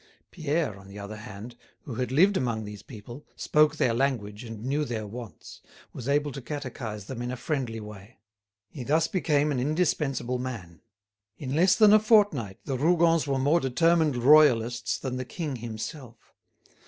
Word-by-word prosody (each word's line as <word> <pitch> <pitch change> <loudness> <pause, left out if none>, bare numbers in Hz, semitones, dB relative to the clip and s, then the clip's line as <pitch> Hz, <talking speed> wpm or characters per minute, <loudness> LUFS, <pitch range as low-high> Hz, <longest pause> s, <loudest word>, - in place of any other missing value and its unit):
Pierre, 155 - -2
on 95 - -15
the 100 +1 -11
other 100 +1 -7
hand, 105 +3 -9 0.3
who 130 - -8
had 125 +2 -3
lived 190 +9 +4
among 115 -7 -1
these 105 0 -8
people, 120 +5 -11
spoke 150 0 +3
their 125 -6 +1
language 115 -4 -1
and 115 -1 -8
knew 145 +3 0
their 115 -6 -4
wants, 110 -4 -10 0.3
was 130 +1 -6
able 145 +1 +1
to 135 - -7
catechise 120 -6 -6
them 120 +1 -6
in 120 - -3
a 125 - -4
friendly 125 -5 -3
way. 105 +2 -11 0.5
He 135 - -7
thus 155 +5 +2
became 150 -5 +1
an 135 - -1
indispensable 135 -4 0
man. 105 -11 -7 0.6
In 135 -2 -5
less 180 +4 +4
than 210 -1 +6
a 215 - +8
fortnight 205 - +3
the 135 -3 -3
Rougons 165 0 +3
were 135 -1 0
more 145 +6 +3
determined 160 +1 +2
royalists 120 -3 +4
than 130 -1 -4
the 130 - -3
king 150 -1 -5
himself. 115 +2 -8
130 Hz, 170 wpm, -27 LUFS, 115-150 Hz, 0.6 s, a